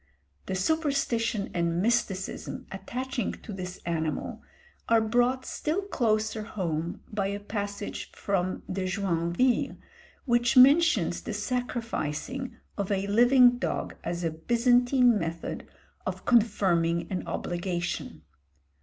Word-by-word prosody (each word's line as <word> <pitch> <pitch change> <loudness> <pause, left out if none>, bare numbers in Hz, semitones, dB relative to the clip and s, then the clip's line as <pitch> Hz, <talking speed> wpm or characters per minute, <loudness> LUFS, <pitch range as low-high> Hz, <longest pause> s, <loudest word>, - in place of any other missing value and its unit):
The 190 - -2
superstition 235 - 0
and 170 0 0
mysticism 205 -3 -1
attaching 245 +5 -3
to 215 - -9
this 180 -1 -6
animal 160 -2 -2 0.5
are 230 0 +6
brought 245 +4 +1
still 330 +6 -2
closer 220 - 0
home 170 -6 -3
by 200 -2 0
a 200 +1 -3
passage 205 0 -5
from 185 -2 -1
De 185 0 -2
Joinville, 185 +4 +1 0.5
which 240 -1 +2
mentions 285 +7 +6
the - - -5
sacrificing 245 - -3 0.2
of 200 0 -1
a 195 0 0
living 245 +4 +5
dog - - -2
as 170 +1 -3
a 165 - 0
Byzantine 245 - +3
method 165 0 -4 0.4
of - - -4
confirming 190 -8 +3
an 185 - -3
obligation. 175 0 -3
210 Hz, 110 wpm, -28 LUFS, 180-245 Hz, 0.5 s, are